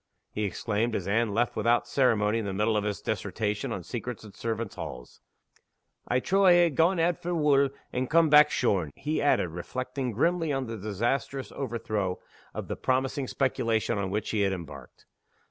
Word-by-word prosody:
he 105 - -2
exclaimed, 110 +3 -1
as 95 - -3
Anne 110 +2 +1
left 115 +3 +1
him - - -13
without 115 +2 +2
ceremony 115 -5 +2
in 110 - -3
the 100 - -3
middle 105 +3 +1
of 105 - +1
his 105 -1 -3
dissertation 105 0 -2
on 90 - -4
secrets 120 +3 -6
and 105 -2 -12
servants' 115 -2 -3
halls. 60 0 -8 0.9
"I 125 - +2
trow 195 +8 +1
I 185 -2 +8
ha' 160 - -4
gaen 170 +5 +3
out 170 +1 +1
for 175 +1 -2
wool, 140 -3 +3 0.2
and 125 0 -1
come 165 0 +5
back 150 0 +7
shorn," 90 - +1
he 155 +2 -2
added, 145 -10 +2
reflecting 125 +9 -4
grimly 165 - +1
on 135 -2 -1
the 115 -1 -5
disastrous 120 +6 -2
overthrow 110 -7 -2 0.3
of - - -6
the - - -3
promising 130 +1 -1
speculation 115 -5 0
on 95 -1 -2
which 105 +2 -2
he 110 - 0
had 100 -1 +2
embarked. 80 -7 -9
115 Hz, 185 wpm, -28 LUFS, 105-135 Hz, 0.9 s, I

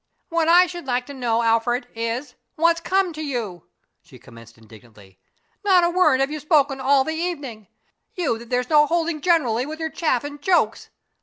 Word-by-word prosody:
"What 335 -1 0
I 350 +2 +6
should 350 -5 -8
like 250 0 -1
to 285 - -9
know, 235 -3 -1
Alfred, 240 +2 +1
is 230 +4 -4 0.2
what's 335 +1 +2
come 375 0 0
to 310 - -7
you?" 225 - -5 0.3
she - - -17
commenced 115 -1 -16
indignantly. 110 -4 -18 0.4
"Not 375 -3 +4
a 345 - +2
word 310 -7 +3
have 270 +2 0
you 305 - -4
spoken 285 -3 +1
all 270 0 +3
the 315 - -3
evening 285 - -5 0.5
you 295 -11 -1
that 235 0 -13
there's 250 +1 -1
no 300 -1 +5
holding 335 -2 -1
generally 270 -8 +1
with 315 +1 -7
your 320 -1 -3
chaff 285 -7 0
and 290 0 -8
jokes. 360 +3 +1
280 Hz, 185 wpm, -22 LUFS, 235-330 Hz, 0.5 s, I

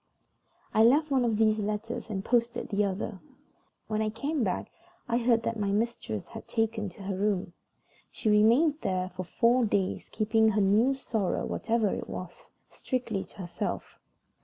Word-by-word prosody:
I 220 - +4
left 290 +6 +4
one 265 -2 +3
of 230 -3 +1
these 215 0 +3
letters 215 +2 -3
and 195 -2 -3
posted 240 0 +1
the 205 +1 +1
other. 195 0 -3 0.7
When 215 0 -1
I 215 - +1
came 275 +6 -2
back 190 - -2 0.4
I 235 0 +1
heard 230 -1 +3
that 230 -1 -2
my 200 -1 0
mistress 205 - -2
had - - -9
taken 225 -2 -1
to 190 +2 -12
her 195 0 -2
room. 195 -2 -1 0.6
She - - -4
remained 235 +9 +4
there 185 -1 -1
for 185 - -3
four 240 +7 +3
days, 200 -4 0
keeping 220 0 +2
her 210 -1 +2
new 215 +7 +4
sorrow, 220 -7 -1
whatever 225 -2 0
it - - -5
was, 180 -1 -8 0.2
strictly 230 -6 -3
to - - -20
herself. 180 -3 -5
220 Hz, 165 wpm, -29 LUFS, 200-235 Hz, 0.7 s, I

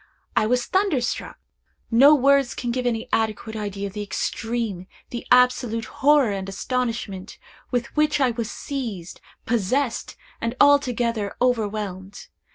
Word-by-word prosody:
I 215 - +3
was 245 +1 +1
thunderstruck! 350 - -1 0.5
No 275 +6 +7
words 275 -1 +3
can 240 - -3
give 250 0 -1
any 225 -2 -1
adequate 220 0 -1
idea 200 -2 -4
of 195 - -6
the 210 - -4
extreme, 215 -2 -3 0.2
the 240 - -6
absolute 250 -2 +3
horror 280 -1 +3
and 195 -1 -4
astonishment, 225 -3 -3 0.3
with 245 -2 -2
which 300 0 +2
I 260 -3 +3
was 230 -1 -4
seized 225 -14 -6 0.2
possessed, 235 +3 -1 0.3
and 230 +2 -2
altogether 245 -7 +3
overwhelmed. 205 -5 -2
235 Hz, 130 wpm, -23 LUFS, 210-255 Hz, 0.5 s, No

